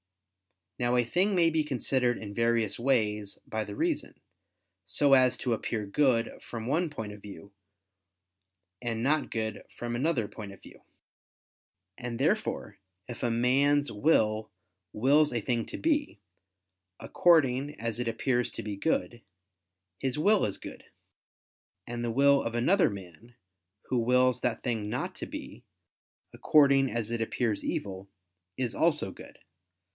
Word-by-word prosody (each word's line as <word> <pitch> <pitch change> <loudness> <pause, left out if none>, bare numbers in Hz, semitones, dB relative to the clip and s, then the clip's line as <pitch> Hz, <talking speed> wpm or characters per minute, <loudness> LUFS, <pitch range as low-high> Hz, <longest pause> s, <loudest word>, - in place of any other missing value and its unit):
Now 120 0 +1
a 120 -1 +3
thing 190 - +1
may 170 -2 +4
be 160 -1 +2
considered 130 -3 0
in 100 -2 -7
various 115 -2 +1
ways 105 -5 0
by 110 0 -3
the 100 - -7
reason, - - -2 0.6
so 140 -1 +2
as 130 -2 +5
to 125 - -1
appear 110 -1 -3
good 120 +1 +1
from 115 -2 -7
one 160 +7 0
point 110 -8 -6
of 105 - -12
view, 100 0 -11 1.3
and 115 -2 -2
not 150 +2 +2
good 110 -2 -3
from 120 0 -3
another 130 -4 0
point 105 -1 -9
of 100 - -16
view. - - -14 1.2
And 120 -1 -4
therefore 155 - -1 0.3
if 120 - -8
a 120 - +1
man's 140 +5 +2
will 110 -3 +2 0.4
wills 145 +7 +3
a 120 - -1
thing 115 0 -1
to - - -6
be, 295 - 0 0.8
according 145 -4 +2
as 115 0 -3
it 120 - -2
appears 120 +2 0
to - - -6
be 105 -1 -4
good, 120 0 -1 0.8
his 130 0 -2
will 205 +6 +3
is 100 - -3
good: - - -10 1.0
and 120 0 -5
the 120 - -1
will 140 +3 +4
of 115 0 -4
another 180 +12 +3
man, 100 +4 -11 0.5
who 125 - -1
wills 125 +1 +3
that 120 -2 -1
thing 110 -4 -2
not - - -3
to - - -7
be, - - -9 0.7
according 140 -3 +4
as 115 -2 -3
it 120 -1 -2
appears 115 -1 -1
evil, 95 -1 -4 0.5
is 125 -3 -1
also 155 - +1
good. - - -13
120 Hz, 145 wpm, -29 LUFS, 110-140 Hz, 1.3 s, as